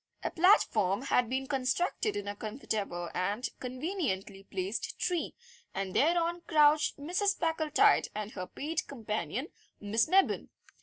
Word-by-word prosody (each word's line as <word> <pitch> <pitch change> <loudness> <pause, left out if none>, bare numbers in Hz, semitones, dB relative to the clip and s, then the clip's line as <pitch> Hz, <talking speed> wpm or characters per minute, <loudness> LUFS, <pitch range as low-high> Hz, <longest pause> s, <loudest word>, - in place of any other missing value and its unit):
A - - -1
platform 235 - +3
had 250 -4 +2
been 265 +1 -1
constructed 280 - 0
in 205 - -4
a 205 - -3
comfortable 205 -6 -4
and 205 +7 -1
conveniently 255 - -3
placed 195 +2 -4
tree, 355 -3 -1 0.4
and 190 -1 -3
thereon 340 +2 +2
crouched 300 -1 +4
Mrs. 360 +8 0
Packletide 320 -2 +3
and 210 0 -4
her 185 - -6
paid 310 - -3
companion, 235 +3 -3 0.3
Miss 215 +2 +1
Mebbin. 380 +3 +3
260 Hz, 130 wpm, -31 LUFS, 205-325 Hz, 0.4 s, crouched